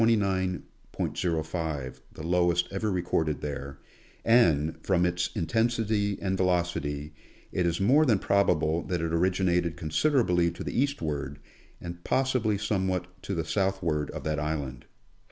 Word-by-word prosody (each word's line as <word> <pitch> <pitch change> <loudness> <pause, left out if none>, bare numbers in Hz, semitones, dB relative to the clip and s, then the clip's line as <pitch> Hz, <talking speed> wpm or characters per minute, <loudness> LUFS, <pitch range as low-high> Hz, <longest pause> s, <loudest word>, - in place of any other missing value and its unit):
05, 95 -5 +2 1.5
the 80 - -8
lowest 90 0 +2
ever 100 +2 -1
recorded 85 -4 0
there, 70 -1 -5 0.5
and, 80 -10 +3
from 90 -2 +2
its 90 0 0
intensity 110 +2 +1
and 95 -1 -1
velocity, 85 -5 0 0.4
it 90 -1 +1
is 85 0 0
more 130 +11 +5
than 120 -9 +4
probable 85 -5 +2
that 90 0 -2
it 80 0 -2
originated 90 -2 +1
consid 80 - 0
erably 90 -10 +3
to 85 - -7
the - - -5
eastward, 75 - -2 0.4
and 85 0 -8
possibly 130 -6 +1
somewhat 95 -3 -2
to 100 - -3
the 80 -2 -2
southward 85 -6 0
of - - -6
that 75 -1 -1
island. 70 -5 -3
90 Hz, 135 wpm, -28 LUFS, 80-100 Hz, 1.5 s, more